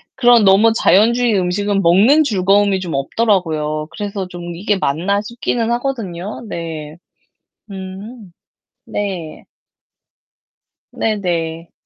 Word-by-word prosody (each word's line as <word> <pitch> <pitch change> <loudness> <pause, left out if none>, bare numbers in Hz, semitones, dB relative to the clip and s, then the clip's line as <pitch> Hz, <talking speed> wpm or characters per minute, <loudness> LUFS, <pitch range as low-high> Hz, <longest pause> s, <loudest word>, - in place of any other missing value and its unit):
그런 240 -3 +5
너무 205 +4 +5
자연주의 230 +2 +3
음식은 195 +2 0
먹는 215 - +5
즐거움이 200 -3 +2
좀 175 -4 -5
없더라고요. 155 -2 0
그래서 200 -3 -5
좀 175 -1 -8
'이게 205 +3 0
맞나?' 185 +5 0
싶기는 235 +1 -2
하거든요. 215 -7 -4
네. 160 -2 -6 0.7
음. 195 +2 -9 0.5
네. 190 -6 -5 1.5
네네. 170 -6 -2
195 Hz, 220 characters per minute, -17 LUFS, 170-215 Hz, 1.5 s, 그런